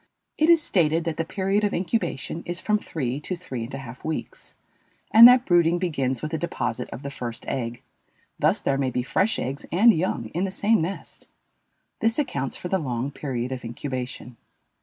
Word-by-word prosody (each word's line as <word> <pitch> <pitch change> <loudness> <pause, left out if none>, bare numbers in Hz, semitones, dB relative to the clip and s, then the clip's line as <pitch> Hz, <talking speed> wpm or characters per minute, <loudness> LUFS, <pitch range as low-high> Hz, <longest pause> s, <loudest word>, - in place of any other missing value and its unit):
It 310 +2 +4
is 335 -2 +6
stated 165 - +2
that 160 -1 -3
the 165 - 0
period 195 +4 0
of 205 - +1
incubation 170 - -2
is 175 0 -3
from 210 +2 +1
three 135 - -3
to 180 +5 -4
three 130 -10 -6
and 115 - -11
a - - -4
half 130 -2 -10
weeks, 160 0 -5 0.6
and 230 +2 +11
that 250 0 +6
brooding 175 -1 +4
begins 135 -8 -1
with 155 - -3
the 160 - -2
deposit 130 -8 -3
of 130 - -8
the 140 - -5
first 120 -3 -6
egg; 120 -2 -3 0.6
thus - - +2
there 135 0 0
may 135 -2 +1
be 125 0 -2
fresh 200 - +1
eggs 135 +3 -4
and 220 +7 +6
young 155 - -1
in 175 - -1
the 195 - 0
same 205 +2 +2
nest. 180 +5 -6 0.7
This 225 0 +1
accounts 140 - -2
for - - -6
the 190 +1 0
long 130 -2 -3
period 130 -4 -4
of 130 -1 -5
incubation. 125 0 -6
160 Hz, 195 wpm, -25 LUFS, 130-190 Hz, 0.7 s, and